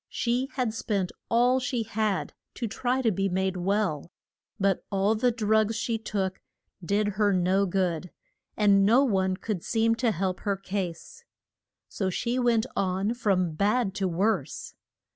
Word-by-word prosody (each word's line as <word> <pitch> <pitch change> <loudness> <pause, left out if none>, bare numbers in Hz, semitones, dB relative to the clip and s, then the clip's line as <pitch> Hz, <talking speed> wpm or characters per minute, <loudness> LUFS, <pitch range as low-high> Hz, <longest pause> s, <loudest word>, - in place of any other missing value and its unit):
She 250 +3 -1
had 245 -5 -1
spent 200 -5 -2 0.2
all 245 +2 +3
she 250 -2 -1
had 215 -2 -1 0.2
to 235 - -3
try 250 +4 -1
to 225 - +3
be 195 +1 0
made 190 +1 0
well; 180 -4 -1 0.5
but 195 -2 +1
all 200 +2 +2
the 240 +3 +2
drugs 220 -1 +1
she 230 0 -1
took 195 -4 -3 0.4
did 205 +4 +1
her 205 +1 +1
no 190 +2 +2
good, 180 -2 -1 0.5
and 200 -2 +5
no 235 +7 +5
one 190 -6 +1
could 205 -5 -4
seem 225 0 +2
to 235 0 +2
help 185 -2 -1
her 200 -1 -1
case. 195 - -5 0.6
So 190 -2 -2
she 240 +7 -1
went 235 -2 +2
on 190 +3 0
from 195 -7 +1
bad 205 +4 +1
to 195 -2 0
worse. 195 +6 -1
205 Hz, 155 wpm, -27 LUFS, 190-230 Hz, 0.6 s, and